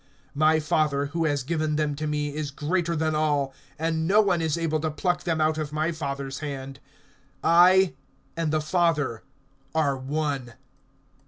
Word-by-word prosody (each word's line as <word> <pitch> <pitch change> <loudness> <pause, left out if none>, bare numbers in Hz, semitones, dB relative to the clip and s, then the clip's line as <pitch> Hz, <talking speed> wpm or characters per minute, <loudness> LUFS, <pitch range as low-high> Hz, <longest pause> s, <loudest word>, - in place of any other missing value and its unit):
(29)My 155 +2 +4
Father, 150 -2 +1
who 165 +3 -2
has 145 -3 0
given 155 +1 -1
them 150 -1 0
to 155 +2 -4
me, 150 -1 -2
is 150 -1 -3
greater 170 +4 -1
than 155 0 0
all; 145 -3 +1 0.2
and 160 0 -1
no 200 +3 +5
one 190 -5 +3
is 160 -1 0
able 160 -2 0
to 155 +1 -1
pluck 175 +3 -1
them 165 -2 0
out 155 0 +2
of 150 -2 -3
my 155 +2 0
Father's 140 -4 -4
hand. 135 -2 -6 0.6
(30)I 180 +2 +6 0.4
and 165 -2 -1
the 155 0 +1
Father 155 -7 +1 0.5
are 145 -4 +2
one. 135 -2 -3
155 Hz, 165 wpm, -26 LUFS, 145-165 Hz, 0.6 s, 30)I